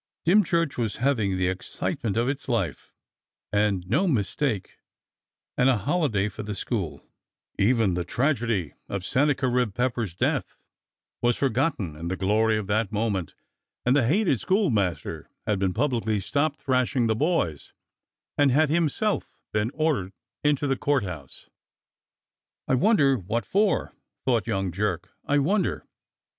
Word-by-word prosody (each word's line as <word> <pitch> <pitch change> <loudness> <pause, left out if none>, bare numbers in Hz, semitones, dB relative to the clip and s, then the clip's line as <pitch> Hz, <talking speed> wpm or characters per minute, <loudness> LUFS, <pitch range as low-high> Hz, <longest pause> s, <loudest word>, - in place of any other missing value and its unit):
Dymchurch 170 -6 +3
was 115 -3 -1
having 115 -7 +1
the 90 -1 +1
excitement 95 +3 -3
of 120 +1 +2
its 135 0 -3
life, 100 - -2 0.6
and 100 -3 +1
no 150 - +2
mistake, 110 - -1 0.8
and 125 - +4
a 130 - +3
holiday 125 - +1
for 105 +1 -7
the 105 -1 -5
school, 95 -6 -3 0.5
even 110 -2 +3
the 90 0 -1
tragedy 115 - 0 0.2
of 100 -2 -3
Sennacherib 125 -4 +1
Pepper's 120 -7 -1
death, - - -1 0.7
was 120 0 +2
forgotten 130 - 0
in 80 +2 -6
the 95 - -1
glory 110 +3 +2
of 105 - -3
that 105 +1 0
moment, 100 -7 -1 0.5
and 125 +2 +4
the 135 -5 +3
hated 170 - +2
schoolmaster 115 - 0 0.2
had 105 -3 0
been 95 -1 +1
publicly 115 -2 0
stopped 145 +8 0
thrashing 130 -1 +1
the 110 -1 +2
boys 120 - 0 0.7
and 145 -1 +5
had 150 +4 +3
himself 170 +6 0 0.2
been 105 +1 +1
ordered 150 - 0 0.3
into 145 -1 +2
the 135 -1 +1
Court 140 -2 +1
House. 80 -8 -8 1.2
"I - - +1
wonder 140 - +4
what 110 +6 -2
for.^^" 200 -5 +1 0.3
thought 120 -5 +1
young 95 -1 -1
Jerk. 90 -2 -2
"I 145 - +2
wonder 185 +9 +1
115 Hz, 140 wpm, -26 LUFS, 100-145 Hz, 1.2 s, and